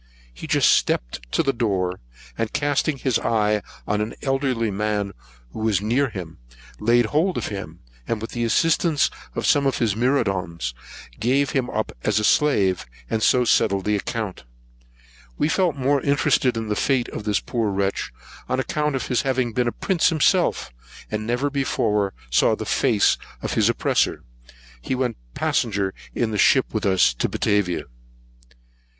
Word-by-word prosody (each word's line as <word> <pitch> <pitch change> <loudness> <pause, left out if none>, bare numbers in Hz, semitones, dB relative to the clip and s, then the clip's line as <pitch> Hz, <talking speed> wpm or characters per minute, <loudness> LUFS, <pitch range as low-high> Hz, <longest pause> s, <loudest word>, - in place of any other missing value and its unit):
He - - -9
just - - +4
stepped - - 0
to - - +2
the 135 - +1
door, 95 -6 -1 0.4
and 115 -1 -2
casting 145 0 0
his 130 -2 0
eye 105 -2 +1 0.3
on 105 +1 0
an 110 +2 -4
elderly 135 -5 0
man 105 0 -1 0.4
who - - -8
was 110 -3 +1
near 120 +7 +1
him, 85 - -8 0.4
he - - -11
laid 120 +1 +4
hold 160 - +1
of - - -2
him; 90 -5 -7 0.3
and, 115 - -1
with 115 - -6
the 120 - -2
assistance 160 +5 +2 0.2
of - - -2
some 140 -1 +3
of 135 - 0
his 110 -4 +1
myrmidons, 95 - 0 0.5
gave 135 +4 +1
him 130 -2 0
up 110 0 -2
as 105 -1 +1
a 105 - +1
slave, 105 -9 +2 0.2
and 110 - 0
so 125 +2 +4
settled 100 -4 +2
his 105 -1 +1
account. 110 - -4 0.9
We - - +2
felt 175 -1 +1
more 140 +1 +1
interested 140 -3 +2
in 110 -1 -3
the 105 - -1
fate 130 +1 +1
of - - -6
this 105 -2 +1
poor 115 -3 -2
wretch, 100 0 -1 0.4
on 130 - 0
account 150 -2 -1
of 135 - -2
his 125 - +1
having 130 -3 0
been 125 +1 +1
a - - +1
prince 180 - +1
himself, 155 - +2 0.4
but 105 - -1
never 120 +6 -1
before 105 -7 0 0.2
saw - - +4
the - - -6
face - - +2 0.2
of - - -2
his - - +3
oppressor. - - +1 0.6
He 130 - -2
went 125 -2 -1 0.2
passenger 100 -4 0 0.2
in 115 -2 0
the 105 - -2
ship 130 - +4
with 110 -2 0
us 95 -9 +4
to - - -1
Batavia. 100 -4 0
115 Hz, 170 wpm, -23 LUFS, 105-135 Hz, 0.9 s, just